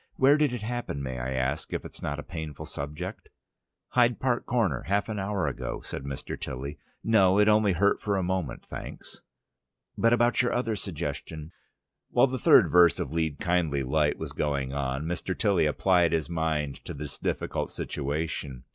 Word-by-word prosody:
Where 135 +2 +5
did 150 -3 +2
it 120 -3 -4
happen, 120 - -3
may 65 -1 -4
I 65 +2 -3
ask, 65 +4 -1
if - - -3
it's - - -8
not 75 0 -2
a 75 - -6
painful 80 -4 -6
subject?" 75 +1 -6 0.6
"Hyde 120 -1 +3
Park 125 -2 0
Corner, 110 - +1
half 100 +3 +1
an 105 -2 -2
hour 100 -1 -1
ago," - - -3
said 70 - -6
Mr. 70 -1 -6
Tilly. 70 +3 -5 0.2
"No, 100 -4 +4
it 105 0 +5
only 105 -2 +4
hurt 100 +4 +2
for 100 -2 0
a 95 - 0
moment, 90 -6 -2
thanks." - - -9 0.7
"But 115 - +3
about 120 +1 +4
your 125 - 0
other 115 -3 0
suggestion 80 -4 -5 0.3
" 70 0 -58
While 120 - +5
the 130 -1 -3
third - - +6
verse 85 -1 +6
of - - -3
"Lead, 80 -3 0
kindly 80 -6 +1
Light" 75 +3 +1
was - - -5
going 70 -3 -1
on, 70 0 -2
Mr. 90 +2 -3
Tilly 100 -7 +3
applied 85 +2 +3
his 80 0 -1
mind 80 -4 -1
to - - -6
this 70 -1 -7
difficult - - -2
situation. 70 -3 -3
85 Hz, 180 wpm, -28 LUFS, 70-105 Hz, 0.7 s, third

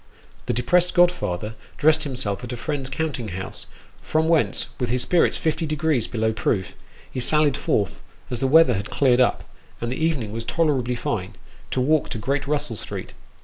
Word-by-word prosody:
The - - +1
depressed 180 - +2
godfather 115 - +2 0.2
dressed 155 +1 +3
himself 110 -7 -3
at 125 - -6
a 125 - -4
friend's 140 0 -3
counting 135 -5 -3
house, 95 +2 -6 0.3
from 160 0 +1
whence, 165 -2 +2
with 125 -3 -1
his 125 +1 +2
spirits 175 - +3
fifty 160 0 -1
degrees 155 -5 +1
below 110 -1 0
proof, 95 -3 -1 0.4
he - - -4
sallied 150 +2 +3
forth 100 -4 -1 0.3
as 125 - -1
the 135 - +1
weather 155 -2 +6
had 100 0 -3
cleared 130 -3 +3
up, 125 - +2 0.4
and 115 +1 -3
the 145 +5 -2
even 160 -6 +1
ing 105 - -7
was 115 +1 -4
tolerably 130 -4 +1
fine 100 -4 -3 0.3
to - - -1
walk 150 +4 +2
to - - -4
Great 135 +5 -1
Russell 145 -5 -1
Street. - - -7
130 Hz, 185 wpm, -23 LUFS, 115-155 Hz, 0.4 s, weather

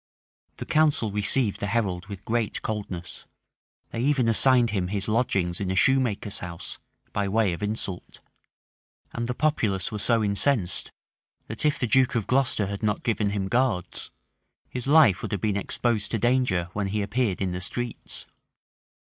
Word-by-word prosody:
The - - -6
council 150 -8 +2
received 105 +2 +1
the 100 - -2
herald 95 -4 -1
with 100 -2 -9
great 115 -1 -1
coldness: 100 -5 -5 0.6
they - - -4
even 135 -2 +2
assigned 120 0 +4
him 95 -4 -1
his 100 +1 -3
lodgings 100 -6 0
in 95 - -2
a 95 - -1
shoemaker's 115 -2 +2
house, 85 -2 -6 0.3
by 100 -1 0
way 105 -2 +2
of 85 - -7
insult; 105 -3 -3 0.9
and 120 0 -3
the 125 - -2
populace 115 -12 0
were 105 - -4
so 115 +1 +2
incensed, 100 0 +1 0.5
that 110 +6 -3
if 150 - +1
the - - -1
duke 130 +2 +3
of 115 -4 0
Glocester 125 -5 +2
had 100 +1 -5
not 105 -1 -1
given 110 -4 0
him 100 -1 -2
guards, 110 -5 0 0.6
his 125 0 -4
life 145 - +6
had 100 - -3
been 105 +1 0
exposed 105 +1 0
to 115 - -1
danger 120 -7 +1
when 100 -1 -1
he 105 +1 -1
appeared 105 -1 -1
in 95 -2 -1
the 90 +1 -4
streets. 120 +5 -4
105 Hz, 165 wpm, -26 LUFS, 95-120 Hz, 0.9 s, life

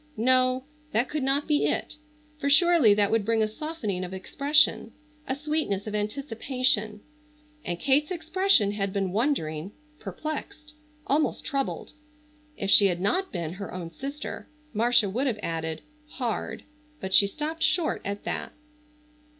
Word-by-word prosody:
No, 255 +2 +3 0.3
that 240 +4 +1
could 305 -1 -2
not 275 +2 +1
be 295 -1 +2
it, - - -2 0.4
for 280 - 0
surely 310 - +6
that 205 -1 +2
would 225 -2 +2
bring 225 +1 +2
a - - +1
softening 215 - -4
of 185 +1 -5
expression, 285 +10 +2 0.3
a 265 - -1
sweetness 295 -9 -2
of 215 - -5
anticipation, 225 -1 -1 0.6
and 175 -1 -3
Kate's 285 +2 +2
expression 345 - +2
had 200 -1 -2
been 195 -2 -1
wondering, 195 - -1 0.3
perplexed, 305 0 -6 0.3
almost 300 +3 0
troubled. 275 -2 -3 0.7
If 195 0 -1
she 200 - +8
had 175 -2 -1
not 365 - 0
been 170 -3 -4
her 200 +1 -7
own 175 -2 -6
sister 280 - -6 0.2
Marcia 230 0 +3
would 245 +8 -1
have 235 -4 0
added, 160 -1 -3 0.3
"hard," 225 -3 -3 0.4
but 190 0 -5
she 200 - +7
stopped 310 +9 -5
short 340 -2 +1
at 200 +1 -4
that. - - -4
230 Hz, 145 wpm, -27 LUFS, 200-295 Hz, 0.7 s, she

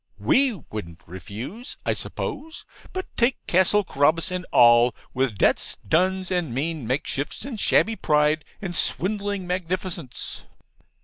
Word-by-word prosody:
We 270 0 +3 0.2
wouldn't 85 -6 -8
refuse, 110 - -8
I - - +2
suppose, 320 +3 -5 0.3
but 375 0 -4
take 240 +2 +2
Castle 190 +3 +3
Carabas 160 +2 +2
and 180 0 -4
all, 120 0 +6 0.2
with 130 -5 0
debts, - - +1
duns, 185 - +1
and 175 -9 -1
mean 150 -2 -2
makeshifts, 140 - -2
and 250 -6 -6
shabby 225 +2 +3
pride, 150 0 +2 0.2
and 175 -2 -3
swindling 200 +2 +1
magnificence. 180 -4 -3
175 Hz, 125 wpm, -24 LUFS, 135-195 Hz, 0.3 s, all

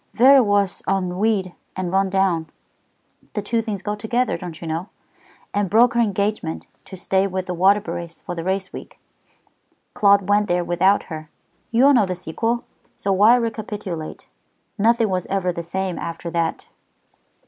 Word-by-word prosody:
Vera 265 +3 +7
was 205 -4 +1
ennuied 190 0 0 0.2
and 185 -2 -3
run 195 0 +2
down 185 -5 +1 0.8
the 210 - -2
two 230 +2 0
things 210 -4 -5
go 210 - -2
together, 235 +4 -1
don't 175 -4 -7
you - - -8
know 165 +5 -3 0.6
and 205 -2 0
broke 230 +4 +5
her 235 - +1
engagement 200 -6 -1 0.2
to 190 - -10
stay 190 +2 +1
with 185 -1 -3
the 180 - -3
Waterburys 180 -2 +1
for - - -5
the 165 -1 -5
race 190 +1 -2
week. - - -10 0.9
Claude 200 -1 +4
went 205 +1 +3
there 175 -1 +1
without 185 +4 +2
her. 155 -2 -8 0.4
You 235 +3 +4
all 285 - +7
know 220 -7 +4
the 185 - -2
sequel, 225 +8 -2 0.3
so 200 - -2
why 210 +5 +6
recapitulate? 210 -8 -4 0.5
Nothing 225 +1 +2
was 185 -2 -2
ever 190 -2 -1
the 170 - -4
same 185 +1 -3
after 170 0 -5
that." 165 -1 -2
195 Hz, 160 wpm, -22 LUFS, 180-210 Hz, 0.9 s, Vera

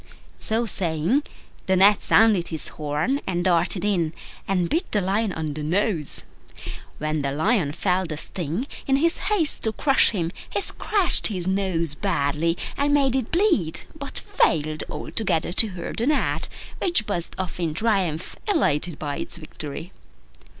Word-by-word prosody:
So 225 +2 -1
saying, 180 - 0 0.5
the 190 - +3
Gnat 200 +3 +5
sounded 210 -6 +4
his 160 -2 -5
horn, 155 - -2
and 175 -2 -1
darted 180 +2 +2
in 175 -6 0 0.3
and 180 -3 +1
bit 340 - -1
the 210 - +2
Lion 200 +3 0
on 155 -3 -4
the 150 - -6
nose. 170 0 -1 0.7
When 155 0 -2
the 140 -1 -1
Lion 160 - +1
felt 180 +2 -1
the 155 - -4
sting, 175 - -2 0.2
in 270 - +3
his 330 +5 +1
haste 360 -8 +4
to 220 - +1
crush 275 +5 +3
him 170 -6 -2 0.2
he - - -1
scratched 400 -1 +2
his 185 -5 -4
nose 185 -5 0
badly, 165 -1 0 0.2
and 285 +1 +1
made 270 -3 +2
it 260 -4 -2
bleed, 335 - +2
but 280 -2 -8
failed 155 -1 0
altogether 175 -7 -1
to 225 - +8
hurt 180 -4 -7
the 235 - 0
Gnat, 300 - 0 0.3
which 345 - +5
buzzed 175 -5 -3
off 185 -1 -4
in 165 -3 -2
triumph, 190 -6 -1
elated 180 - +1
by 145 -2 -4
its - - -4
victory. 155 +1 -6
185 Hz, 155 wpm, -23 LUFS, 160-225 Hz, 0.7 s, to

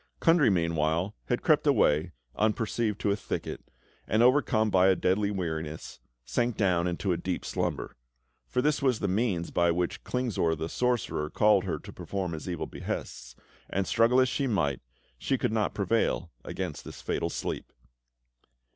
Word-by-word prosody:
Kundry, 165 -6 +5
meanwhile, 85 +1 +1
had - - -1
crept - - +3
away 75 +4 +3 0.2
unperceived 110 0 0
to 100 - +2
a - - +2
thicket, 105 - -5 0.5
and, 110 +3 +3
overcome 120 -4 +3
by 95 0 +5
a 95 - +5
deadly 100 +3 +1
weariness, 80 -5 -4 0.3
sank 120 - 0
down 90 -4 +2
into 90 +2 -1
a 85 - +1
deep 90 +1 -3
slumber; - - -3 0.5
for 125 - 0
this 150 -1 +2
was 130 -4 +2
the 100 - -1
means 95 -3 0
by 85 0 +3
which 85 +1 -1
Klingsor 115 -10 0
the 80 +1 -4
sorcerer 120 -12 -1
called 105 +5 +3
her - - -1
to - - -11
perform 95 -3 -4
his 80 +2 -5
evil 85 -2 -3
behests, 60 -1 -6 0.3
and 95 0 0
struggle 115 +4 +4
as 130 - +5
she 135 +2 -1
might, 75 - 0 0.4
she - - 0
could - - 0
not 110 -2 0
prevail 100 -4 0
against 90 -6 -5
this - - -9
fatal - - -1
sleep. - - -4
95 Hz, 165 wpm, -28 LUFS, 85-115 Hz, 0.5 s, Kundry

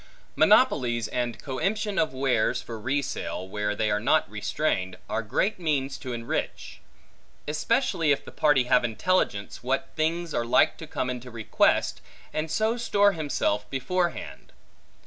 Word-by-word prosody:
Monopolies, 130 - +4
and 120 -2 -2
coemption 200 +9 -1
of 155 - +2
wares 125 -3 +1
for 115 -2 -7
re 135 +6 0
sale, 95 -8 -4
where 105 +1 -2
they 110 0 0
are 105 - +1
not - - +2
restrained, 95 0 -2
are - - -1
great 145 - -1
means 140 -5 -1
to 130 - -6
enrich; 115 -1 -4 0.7
especially 165 - +1
if 140 - 0
the - - -10
party 145 -4 +3
have 125 0 +3
intelligence, 115 - 0
what 135 +7 -1
things 165 +1 -1
are 120 - 0
like 115 - +3
to 160 - -10
come 130 - -2
into 125 0 -7
request, 115 -2 +1 0.3
and 155 +1 -2
so 220 +7 +1
store 205 -4 +3
himself 140 - -1
beforehand. 175 +6 -2
135 Hz, 145 wpm, -26 LUFS, 120-170 Hz, 0.7 s, Monopolies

